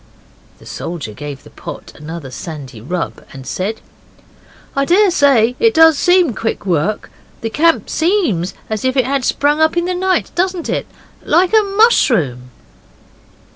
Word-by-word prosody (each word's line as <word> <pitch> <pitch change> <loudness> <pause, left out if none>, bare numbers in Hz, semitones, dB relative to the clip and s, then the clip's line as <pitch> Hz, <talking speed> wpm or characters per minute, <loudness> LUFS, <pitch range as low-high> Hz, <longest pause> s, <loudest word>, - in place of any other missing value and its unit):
The - - -18
soldier 160 -11 -6
gave 145 +3 -8
the - - -16
pot - - -9
another 150 -2 -8
sandy 135 -5 -8
rub, 170 +8 -4
and 135 -1 -10
said 200 - -3 0.9
'I 275 0 +1
daresay 285 - +4
it 455 -3 +3
does 320 -1 +7
seem 355 -3 +3
quick 225 -1 -3
work 180 +3 -1 0.3
the 225 - -3
camp 330 +5 +2
seems 315 - 0
as 215 -2 -4
if 260 +1 0
it 255 - +3
had 270 0 -1
sprung 295 +4 +1
up 315 +2 +2
in 345 - +1
the 365 - -1
night, 370 0 0
doesn't 365 -1 -1
it? - - -2 0.4
like 365 +4 +2
a 440 - +6 0.2
mushroom. 165 - +3
255 Hz, 150 wpm, -16 LUFS, -, 0.9 s, does